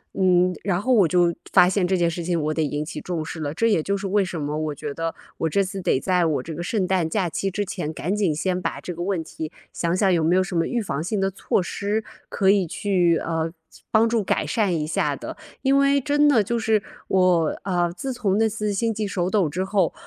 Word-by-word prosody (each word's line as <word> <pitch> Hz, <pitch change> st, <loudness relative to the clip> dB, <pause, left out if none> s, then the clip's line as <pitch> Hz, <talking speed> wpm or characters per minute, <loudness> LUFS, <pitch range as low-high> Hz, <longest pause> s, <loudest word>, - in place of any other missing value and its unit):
嗯， 180 Hz, -1 st, +3 dB
然 185 Hz, -3 st, 0 dB
后 255 Hz, +6 st, +1 dB
我 200 Hz, -7 st, +5 dB
就 175 Hz, +1 st, +3 dB, 0.2 s
发 180 Hz, -, +7 dB
现 185 Hz, -1 st, +1 dB
这 190 Hz, -, +1 dB
件 170 Hz, -1 st, +2 dB
事 170 Hz, +1 st, -4 dB
情， 170 Hz, 0 st, 0 dB
我 155 Hz, 0 st, -1 dB
得 160 Hz, -, -1 dB
引 150 Hz, 0 st, -1 dB
起 150 Hz, -1 st, -6 dB
重 170 Hz, -3 st, -3 dB
视 165 Hz, -, -6 dB
了。 145 Hz, -2 st, -2 dB
这 200 Hz, +9 st, -1 dB
也 205 Hz, -8 st, +3 dB
就 200 Hz, +5 st, -1 dB
是 200 Hz, -, -6 dB
为 200 Hz, +1 st, +2 dB
什 175 Hz, -3 st, -4 dB
么 145 Hz, 0 st, -3 dB
我 155 Hz, -1 st, -2 dB
觉 140 Hz, -, -5 dB
得， 165 Hz, +1 st, -3 dB, 0.2 s
我 160 Hz, -, 0 dB
这 200 Hz, +6 st, +2 dB
次 190 Hz, 0 st, -5 dB
得 130 Hz, -, +1 dB
在 180 Hz, +3 st, +1 dB
我 145 Hz, -5 st, 0 dB
这 165 Hz, -, -6 dB
个 170 Hz, -, -5 dB
圣 190 Hz, +2 st, 0 dB
诞 180 Hz, -3 st, +1 dB
假 190 Hz, 0 st, 0 dB
期 195 Hz, +4 st, -2 dB
之 205 Hz, +2 st, -2 dB
前， 175 Hz, -5 st, -4 dB
赶 175 Hz, +5 st, -2 dB
紧 190 Hz, -7 st, +1 dB
先 180 Hz, +3 st, -1 dB
把 -, -, -3 dB
这 180 Hz, -, -6 dB
个 170 Hz, -, -7 dB
问 180 Hz, -2 st, -1 dB
题， 160 Hz, -1 st, -7 dB, 0.2 s
想 170 Hz, +1 st, -1 dB
想 190 Hz, -2 st, +3 dB
有 165 Hz, -2 st, +2 dB
没 165 Hz, +3 st, +3 dB
有 185 Hz, -, +4 dB
什 185 Hz, -1 st, -5 dB
么 165 Hz, 0 st, +1 dB
预 245 Hz, -, -1 dB
防 155 Hz, -8 st, -3 dB
性 200 Hz, +3 st, -1 dB
的 195 Hz, 0 st, +1 dB
措 190 Hz, 0 st, 0 dB
施 205 Hz, +4 st, -2 dB, 0.3 s
可 195 Hz, -1 st, +3 dB
以 195 Hz, -3 st, +2 dB
去， 175 Hz, -2 st, +1 dB
呃， 165 Hz, 0 st, -2 dB, 0.4 s
帮 220 Hz, +1 st, +4 dB
助 225 Hz, -2 st, +1 dB
改 -, -, 0 dB
善 205 Hz, -8 st, 0 dB
一 150 Hz, -, -1 dB
下 155 Hz, -, 0 dB
的。 -, -, -7 dB, 0.3 s
因 275 Hz, 0 st, +4 dB
为 280 Hz, 0 st, +4 dB
真 290 Hz, +2 st, +3 dB
的 230 Hz, -7 st, +4 dB
就 235 Hz, +3 st, -1 dB
是， 220 Hz, -2 st, +1 dB, 0.2 s
我， 180 Hz, -4 st, +2 dB
呃， 175 Hz, -3 st, 0 dB
自 260 Hz, +10 st, -4 dB
从 210 Hz, -5 st, 0 dB
那 225 Hz, -, +3 dB
次 210 Hz, -1 st, -2 dB
心 225 Hz, +3 st, 0 dB
悸 215 Hz, 0 st, -2 dB
手 185 Hz, -2 st, -1 dB
抖 195 Hz, -7 st, +2 dB
之 180 Hz, +6 st, -2 dB
后， 190 Hz, -5 st, +1 dB
185 Hz, 275 characters per minute, -23 LUFS, 165-205 Hz, 0.4 s, 发